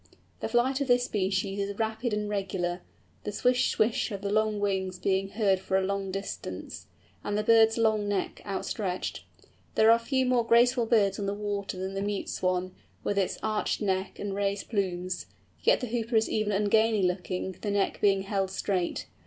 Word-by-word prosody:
The - - -2
flight 255 +4 +2
of 280 - 0
this 245 -1 +4
species 195 -2 -1
is 200 0 -3
rapid 220 +2 -1
and 210 0 -1
regular, 190 -3 -2 0.4
the 210 - -3
swish 250 +4 +2
swish 220 +3 +1
of 200 -1 -5
the 200 - -1
long 215 0 +1
wings 190 -2 -1
being 190 +1 0
heard 195 -2 +2
for 190 0 0
a 190 - +1
long 195 0 -2
distance, 195 +1 -6 0.4
and 205 - -1
the 210 - 0
bird's 225 0 +5
long 220 -2 +2
neck 200 -2 -2
outstretched. 190 -1 -3 0.5
There 220 +1 +6
are 230 - +5
few 260 +2 0
more 250 -1 +3
graceful 235 +1 +4
birds 205 -4 +3
on 200 - -2
the 200 - -1
water 205 -2 -3
than 190 +1 -4
the 195 - -2
Mute 205 0 -2
Swan, 185 0 -1 0.3
with 200 - 0
its 190 - 0
arched 215 -1 0
neck 190 -2 -1
and 205 -1 -4
raised 200 0 -2
plumes, 185 -3 -2 0.3
yet - - +3
the - - -1
Hooper 230 0 -2
is 220 0 +4
even 215 -1 0
ungainly 210 +1 +3
looking, 180 +1 -1
the 210 - -2
neck 200 -1 0
being 195 -1 +3
held 195 -1 -1
straight. 190 -2 -2
205 Hz, 185 wpm, -28 LUFS, 195-220 Hz, 0.5 s, There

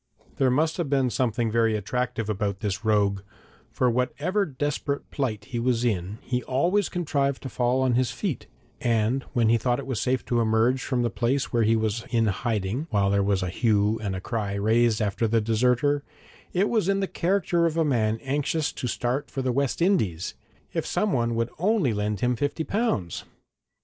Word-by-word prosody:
There 135 - +3
must 155 +5 +1
have 170 -6 -2
been 135 -3 +2
something 115 -1 0
very 115 -1 +2
attractive 115 +1 -2
about 100 -2 -2
this 100 0 -2
rogue, 100 -3 +2 0.5
for 125 - +1
whatever 150 - 0
desperate 145 0 -3
plight 120 -7 -2
he 125 -3 -4
was 120 0 +1
in 100 -2 -1
he 125 -1 -1
always 175 +10 +1
contrived 140 -6 -1
to 135 - -4
fall 125 +1 +1
on 130 -2 +2
his 125 -1 +2
feet; 140 - -4 0.3
and 115 +2 +1
when 120 -4 +3
he 115 0 +4
thought 120 +2 0
it 130 - -4
safe 125 +3 0
to 120 - +1
emerge 115 +3 +2
from 125 -2 -1
the 120 - 0
place 130 +4 -1
where 120 - +3
he 115 +1 +3
was 110 +1 -1
in 115 -1 +2
hiding 110 - -1
while 100 -5 +2
there 100 0 +3
was 100 -1 +1
a 90 - -2
hue 105 +1 +1
and 95 -3 -3
cry 105 -3 -2
raised 110 +2 +2
after 105 +2 0
the 115 +1 +2
deserter, 125 +6 +2 0.5
it 190 +3 +2
was 215 -5 +1
in 195 0 +2
the 195 - 0
character 175 -2 +1
of 165 0 -3
a 165 - +3
man 110 -6 +1
anxious 145 +3 0
to 125 - -4
start 125 +4 -2
for 135 - -3
the 130 - +1
West 140 +5 0
Indies 105 - +1 0.4
if - - -1
someone 120 - 0
would 115 +1 -1
only 185 - +2
lend 105 -1 -2
him 125 0 +2
fifty 145 +6 -1
pounds! 195 - -1
120 Hz, 190 wpm, -26 LUFS, 110-140 Hz, 0.5 s, he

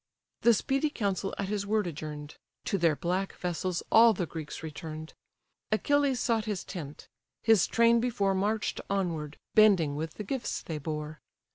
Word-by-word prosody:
The 235 -1 +6
speedy 275 +6 0
council 195 -6 -2
at 200 - -2
his 200 -1 -2
word 215 -1 +1
adjourn'd: 150 -2 -6 0.3
To 195 - 0
their 165 -3 +3
black 185 +5 -2
vessels 180 0 -2
all 230 0 +7
the 180 -3 -2
Greeks 160 -1 -7
return'd. 155 0 -7 0.6
Achilles 280 +3 +2
sought 225 -3 +1
his 210 -4 -3
tent. 150 -5 -8 0.4
His 220 -5 +5
train 235 0 +4
before 215 -5 +1
March'd 205 +3 -1
onward, 165 -7 -2 0.2
bending 190 -9 +5
with 155 +1 -4
the 210 - -5
gifts 240 +3 -3
they 155 -2 -4
bore. 150 0 -5
190 Hz, 155 wpm, -29 LUFS, 160-220 Hz, 0.6 s, all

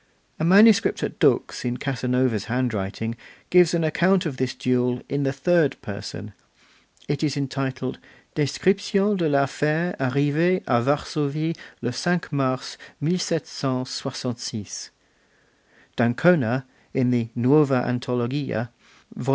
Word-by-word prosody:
A - - -1
manuscript 205 +5 +5
at - - -4
Dux - - +2
in 125 0 -2
Casanova's 125 -5 0
handwriting 115 -2 -2 0.4
gives 180 -1 +5
an 165 - +1
account 180 +4 +2
of 145 -5 -3
this 130 0 -2
duel 125 0 0
in 140 +1 -1
the 135 -1 +1
third 145 +1 +2
person; 105 -1 -7 0.7
it 145 -1 -2
is 145 -2 0
entitled, 135 -2 -3 0.3
'Description 195 +7 +1
de 165 -4 +1
l'affaire 150 +5 +1
arrivee 145 +7 +1
a 120 -1 +2
Varsovie 150 +4 -1 0.3
le 120 - -1
5 175 +6 -1
Mars, 130 -2 -2 0.2
1766'. 130 - -3 1.1
D'Ancona, 125 +1 +3 0.3
in 125 -1 +2
the 120 -2 0
Nuova 135 +1 +4
Antologia 125 -1 -2 0.5
(vol. 125 - -5
135 Hz, 110 wpm, -24 LUFS, 125-160 Hz, 1.1 s, manuscript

